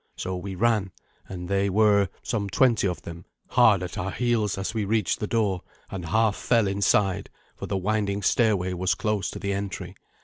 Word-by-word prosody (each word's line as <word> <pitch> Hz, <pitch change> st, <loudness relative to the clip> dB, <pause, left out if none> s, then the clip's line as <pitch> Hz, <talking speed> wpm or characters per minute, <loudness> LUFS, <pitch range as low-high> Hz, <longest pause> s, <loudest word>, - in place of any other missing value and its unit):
So 95 Hz, -, -4 dB
we 95 Hz, +1 st, -5 dB
ran, 105 Hz, -2 st, +1 dB, 0.4 s
and 90 Hz, -2 st, -6 dB
they 100 Hz, +1 st, +1 dB
were, 100 Hz, -1 st, +3 dB
some 105 Hz, -4 st, -2 dB
twenty 120 Hz, -3 st, +3 dB
of 90 Hz, -, -4 dB
them, 85 Hz, +1 st, -8 dB, 0.3 s
hard 110 Hz, -7 st, +4 dB
at 90 Hz, -, -5 dB
our 95 Hz, -, -2 dB
heels 115 Hz, -3 st, 0 dB
as 95 Hz, +3 st, -3 dB
we 110 Hz, -2 st, -1 dB
reached 105 Hz, -2 st, 0 dB
the 105 Hz, -, -2 dB
door, 100 Hz, -5 st, 0 dB, 0.3 s
and 95 Hz, -3 st, -5 dB
half 110 Hz, +2 st, +2 dB
fell 115 Hz, -3 st, +2 dB
inside, 100 Hz, -1 st, +1 dB, 0.3 s
for -, -, -7 dB
the 100 Hz, -, -1 dB
winding 100 Hz, +1 st, -1 dB
stairway 100 Hz, -6 st, +2 dB
was 90 Hz, +1 st, 0 dB
close 105 Hz, 0 st, -1 dB
to -, -, -7 dB
the 100 Hz, 0 st, -2 dB
entry. 95 Hz, -2 st, -5 dB
100 Hz, 190 wpm, -25 LUFS, 95-110 Hz, 0.4 s, hard